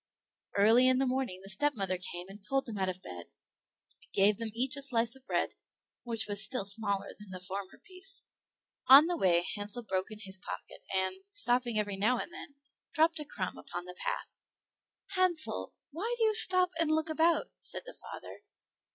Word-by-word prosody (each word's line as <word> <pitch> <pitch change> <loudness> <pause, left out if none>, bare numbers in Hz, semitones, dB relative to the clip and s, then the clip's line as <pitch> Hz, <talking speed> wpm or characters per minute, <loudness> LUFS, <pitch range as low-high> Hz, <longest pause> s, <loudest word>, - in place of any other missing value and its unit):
Early 225 +5 +6
in 255 0 +4
the 270 - +2
morning 255 -8 -2
the 195 - -7
stepmother 195 -6 +1
came 175 0 -6
and 200 +2 -12
pulled 270 +6 -1
them 215 -4 -6
out 190 -1 0
of 185 0 -6
bed, 85 -1 -9 0.7
and - - -25
gave 200 +1 +4
them 230 -1 -3
each 255 +4 0
a 280 - -3
slice 235 -3 +1
of 265 -1 -19
bread, - - 0 0.5
which 230 -2 -2
was 205 0 +3
still 250 -6 0
smaller 200 -1 +4
than 210 -1 -13
the 185 -1 -7
former 190 +1 -6
piece. 380 +1 -5 0.6
On 275 +4 +10
the 350 +1 -1
way 175 - +2
Hansel 205 +3 -5
broke 190 -3 -2
his - - -8
in - - -15
his 190 0 0
pocket, - - -8
and, 190 - 0
stopping 245 - +1
every 205 -2 -1
now 225 +6 +2
and 340 - -6
then, 375 -7 -10 0.4
dropped 320 +1 +3
a 300 - -5
crumb 190 -10 -5
upon 175 0 -7
the 180 - -8
path. - - -5 0.7
"Hansel, 365 -4 0 0.2
why 425 +11 -3
do 460 - +1
you 435 -1 +3
stop 365 -3 +5
and 330 -2 +2
look 315 0 +1
about?" 330 +8 +2
said - - -3
the - - -9
father. - - -10
235 Hz, 195 wpm, -31 LUFS, 195-310 Hz, 0.7 s, On